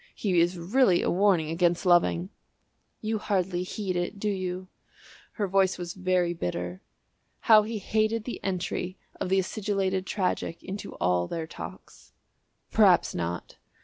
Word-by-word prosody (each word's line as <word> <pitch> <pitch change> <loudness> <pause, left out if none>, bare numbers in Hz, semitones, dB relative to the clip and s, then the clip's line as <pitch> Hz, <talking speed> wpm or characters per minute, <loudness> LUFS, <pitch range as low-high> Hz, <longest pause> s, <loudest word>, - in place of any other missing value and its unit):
He 185 -5 +1
is 175 +2 +1
really 185 +2 +3
a - - +1
warning 180 -4 +3
against 175 +1 +1
loving." 175 +1 +3 0.7
"You 220 0 -1
hardly 185 -3 0
heed 185 0 -3
it, 175 +3 -2
do 210 +1 -1
you?" 185 -1 -4 0.7
Her 205 -3 -1
voice 190 0 +2
was 175 -1 -5
very 185 -2 +1
bitter. 90 - -4 0.6
How 215 -2 +7
he 220 +1 -4
hated 215 +2 0
the 245 - -6
entry 185 0 -2 0.2
of - - -2
the 190 - +3
acidulated 190 -1 -1
tragic 180 -4 -2
into 195 +2 -6
all 90 -1 +1
their 165 -1 -3
talks. - - -11 0.6
"Perhaps - - +5
not." 85 0 -4
185 Hz, 145 wpm, -27 LUFS, 175-200 Hz, 0.7 s, How